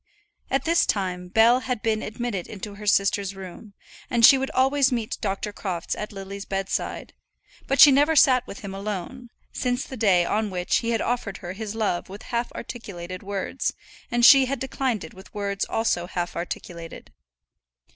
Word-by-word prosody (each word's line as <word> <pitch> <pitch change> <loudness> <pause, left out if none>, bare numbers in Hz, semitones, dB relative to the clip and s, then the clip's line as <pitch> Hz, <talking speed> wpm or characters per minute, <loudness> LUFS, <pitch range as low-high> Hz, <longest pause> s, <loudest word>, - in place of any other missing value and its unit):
At 270 - +1
this 335 +1 +3
time 180 -3 -1
Bell 225 +6 +5
had 250 -3 -4
been 220 -1 +1
admitted 215 -4 -4
into 210 0 -7
her 210 +1 -9
sister's 200 -1 +2
room, 195 +2 -10 0.3
and 235 -1 +5
she 275 - +9
would 265 0 -1
always 270 +1 +3
meet 230 -3 -2
Dr. 205 +1 -3
Crofts 180 -5 -3
at 210 - -5
Lily's 195 0 -7
bedside; 195 0 -3 0.5
but 275 - 0
she 290 - +10
never 290 +4 +4
sat 255 -3 +5
with 200 - -9
him 200 -2 -7
alone, 210 +5 -5 0.2
since 250 0 -1
the 265 - -8
day 195 -7 +3
on 215 +2 0
which 180 -1 0
he 230 - -2
had 230 - +1
offered 230 -5 -2
her 180 -2 -7
his 215 +1 -6
love 205 -6 -1
with 200 +2 -9
half 235 0 -1
articulated 185 -7 -7
words, 200 +6 -3 0.3
and 240 0 +3
she 270 0 +9
had 270 0 -3
declined 260 -4 -2
it 160 - -10
with 190 +1 -14
words 200 -1 -2
also 175 -6 0
half 175 -1 -4
articulated. 170 -1 -7
210 Hz, 175 wpm, -24 LUFS, 195-245 Hz, 0.5 s, she